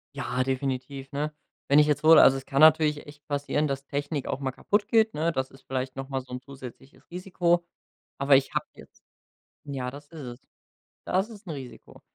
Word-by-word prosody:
Ja, 125 +1 -1
definitiv, 135 +1 -3
ne? 150 +2 -2 0.4
Wenn 145 +2 +6
ich 150 - +5
jetzt 150 +1 0
hole 160 +1 +9
also 135 - +6
es 135 - -8
kann 140 0 0
natürlich 155 -1 +5
echt 145 0 -14
passieren, 145 +1 0
dass 135 0 -4
Technik 145 0 -3
auch - - -2
mal 135 -1 -2
kaputt 205 - 0
geht, 225 -1 +3
ne? 160 +3 0
Das 130 -3 -3
ist 135 - -18
vielleicht 130 0 -3
noch 135 0 -6
mal 135 -1 -2
so 125 0 -12
'n 125 - -5
zusätzliches 135 0 -12
Risiko, 175 -1 0 0.5
aber 140 0 +5
ich 135 0 +2
habe - - -1
jetzt - - -17 0.6
Ja, 135 -3 -4
das 145 +2 -12
ist 165 - -12
es. 120 +1 -8 0.7
Das 190 +5 +1
ist 210 -2 -13
'n 165 - -4
Risiko. 130 -3 -11
140 Hz, 205 wpm, -27 LUFS, 135-155 Hz, 0.7 s, hole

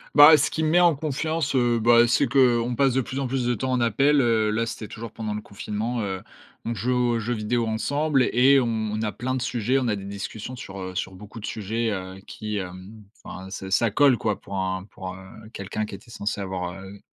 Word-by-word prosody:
Bah 150 +2 +10
ce 145 - +1
qui 160 - -2
me 155 - +2
met 175 +2 +5
en 170 -4 +5
confiance, 155 +1 -2
heu, 120 -2 +3
bah, 120 +1 +5
c'est 120 +3 +3
qu'on 120 -3 +3
passe 135 -3 +3
de 135 - +2
plus 130 +3 -5
en 135 - -1
plus 130 -1 -1
de 125 - +2
temps 130 +3 -2
en 125 -1 +1
appel, 135 +6 +3
heu 110 -3 +2
là, 115 +2 0
c'était 110 -1 -6
toujours 115 0 -8
pendant 110 -2 -4
le 105 - -4
confinement. 110 +4 -4
Heu, 95 -2 -3 0.4
on 115 - -1
jouait 120 +5 -1
aux 120 -2 +1
jeux 120 +3 -2
vidéo 115 +2 -1
ensemble 140 +5 +1
et 135 +3 +5
on 125 - +1 0.3
on 110 - -2
a 105 -1 -1
plein 130 +2 -3
de 130 - -2
sujets. 125 +1 0
On 125 - -1
a 105 - +1
des 100 0 -7
discussions 100 +5 -6
sur, 100 -5 -8
heu, 95 0 -6
sur 95 - -3
beaucoup 105 +3 -11
de 105 - -6
sujets, 110 +2 -2
heu, 95 -1 -5
qui 105 -1 -5
hem 95 +3 -8 0.2
enfin 95 +1 -8
ça 95 0 -6
ça 115 +1 +3
colle 135 0 +5
quoi. 105 -3 -1
Pour 100 - -8
un 95 0 -2
pour, 95 -3 -8
heu, - - -11 0.3
quelqu'un 105 +2 -4
qui 100 - -8
était 115 +4 -15
censé 105 -1 -3
avoir, 90 -2 -3
heu, 100 +1 -11
115 Hz, 240 wpm, -25 LUFS, 100-130 Hz, 0.4 s, Bah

